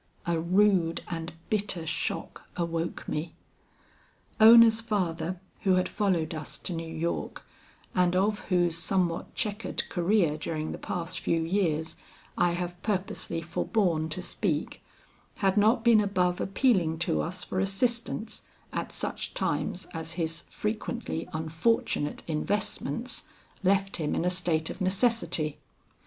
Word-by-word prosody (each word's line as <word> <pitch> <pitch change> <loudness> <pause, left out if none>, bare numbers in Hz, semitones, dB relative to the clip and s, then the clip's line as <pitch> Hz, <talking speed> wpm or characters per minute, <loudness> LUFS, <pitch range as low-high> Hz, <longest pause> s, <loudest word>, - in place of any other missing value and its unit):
"A 170 -1 +1
rude 180 -1 +3
and 165 0 -4 0.2
bitter 200 -5 0
shock - - -3
awoke 170 -1 -2
me. 155 +1 -3 1.0
Ona's 225 0 +9
father, 180 -5 -1 0.2
who 190 -2 +3
had 185 - +2
followed 180 -6 0
us 155 -1 -6
to 180 - -5
New 165 -1 -4
York, 165 +1 -3 0.5
and 180 -1 +3
of 205 +3 +2
whose 175 -3 +2
somewhat 175 -1 0
checkered 210 +1 -2
career 175 -4 +2
during 155 0 -3
the - - -6
past 170 0 -3
few 165 - +1
years, 165 -3 0 0.4
I 175 - +3
have 175 0 -4
purposely 190 -5 -2
forborne 165 -2 0
to 180 +3 -2
speak, 165 -5 -2 0.5
had 195 -2 +1
not 220 +3 +4
been 230 -3 +6
above 180 -3 +1
appealing 190 -7 +2
to 165 - +1
us 180 +2 -3
for 185 - -3
assistance 220 +3 -1 0.3
at - - -3
such - - -2
times 190 -2 -1
as 160 0 -3
his 165 -1 -1
frequently 215 -4 -3
unfortunate 160 0 0
investments 205 - -2 0.4
left 195 +1 +2
him 155 -3 -1
in 170 - 0
a 180 - +3
state 170 -3 0
of - - -9
necessity. 185 - +1
180 Hz, 130 wpm, -28 LUFS, 165-205 Hz, 1.0 s, Ona's